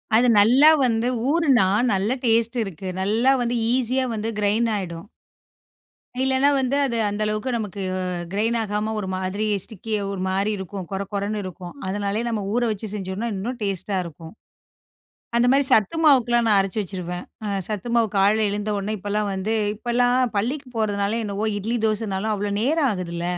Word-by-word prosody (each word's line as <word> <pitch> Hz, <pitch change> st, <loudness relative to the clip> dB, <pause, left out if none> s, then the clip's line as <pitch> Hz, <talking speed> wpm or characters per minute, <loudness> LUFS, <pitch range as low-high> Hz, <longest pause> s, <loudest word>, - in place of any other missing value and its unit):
அது 240 Hz, +3 st, +5 dB
நல்லா 255 Hz, +9 st, +7 dB, 0.2 s
வந்து 230 Hz, 0 st, +1 dB, 0.2 s
ஊறுன்னா, 280 Hz, -, +4 dB, 0.3 s
நல்ல 195 Hz, +2 st, 0 dB, 0.2 s
டேஸ்ட் 230 Hz, +1 st, +2 dB
இருக்கு. 190 Hz, -2 st, -7 dB
நல்லா 225 Hz, +7 st, +2 dB
வந்து 240 Hz, 0 st, -1 dB, 0.2 s
ஈசியா 255 Hz, +1 st, +1 dB
வந்து 220 Hz, +1 st, -3 dB
கிரைன் 215 Hz, +3 st, +2 dB
ஆயிடும். 180 Hz, -2 st, -5 dB, 1.1 s
இல்லன்னா 265 Hz, +2 st, +3 dB
வந்து 265 Hz, 0 st, 0 dB
அது 235 Hz, -3 st, -2 dB
அந்த 205 Hz, +1 st, -4 dB
அளவுக்கு 215 Hz, +4 st, -2 dB
நமக்கு 210 Hz, -3 st, -4 dB, 0.5 s
கிரைன் 220 Hz, +4 st, 0 dB
ஆகாம 210 Hz, +1 st, -2 dB
ஒரு 190 Hz, -, -4 dB
மாதிரி 190 Hz, +3 st, -2 dB, 0.2 s
ஸ்டிக்கியா 215 Hz, 0 st, -4 dB
ஒருமாரி 195 Hz, +2 st, -1 dB
இருக்கும். 190 Hz, -1 st, -6 dB
கொரகொரன்னு 200 Hz, +2 st, -3 dB
இருக்கும். 185 Hz, -1 st, -8 dB
அதுனாலே 200 Hz, +2 st, -1 dB
நம்ம 220 Hz, -3 st, -1 dB
ஊற 245 Hz, -, +1 dB
வச்சு 215 Hz, +1 st, -5 dB
செஞ்சோன்னா, 200 Hz, +3 st, -4 dB
இன்னும் 235 Hz, +6 st, -4 dB
டேஸ்ட்டா 195 Hz, 0 st, -2 dB
இருக்கும். 165 Hz, 0 st, -10 dB, 1.0 s
அந்த 240 Hz, +1 st, +4 dB
மாதிரி 280 Hz, +1 st, +4 dB
சத்து 215 Hz, -, +3 dB
மாவுக்குல்லாம் 240 Hz, -5 st, +4 dB
நான் 210 Hz, -2 st, +5 dB
அரைச்சு 195 Hz, +2 st, 0 dB
வச்சுருவேன். 180 Hz, -2 st, -6 dB, 0.2 s
அ -, -, -2 dB, 0.2 s
சத்து 215 Hz, +2 st, -4 dB
மாவு 230 Hz, -2 st, +3 dB
காலையில 210 Hz, +2 st, +3 dB
எழுந்தவுனே, 205 Hz, 0 st, -2 dB
இப்பல்லாம் 205 Hz, +1 st, -2 dB
வந்து 200 Hz, +4 st, -1 dB, 0.2 s
இப்பல்லாம் 245 Hz, +2 st, +1 dB
பள்ளிக்கு 260 Hz, +6 st, -2 dB
போறதுனால 205 Hz, +1 st, 0 dB
என்னவோ! 205 Hz, +1 st, -2 dB
இட்லி 225 Hz, +4 st, -2 dB
தோசனாலும் 215 Hz, -1 st, -1 dB
அவ்ளோ 205 Hz, 0 st, -2 dB
நேரம் 290 Hz, +2 st, +2 dB
ஆகுதுல்ல. 170 Hz, -3 st, -4 dB
210 Hz, 150 wpm, -23 LUFS, 195-235 Hz, 1.1 s, நல்லா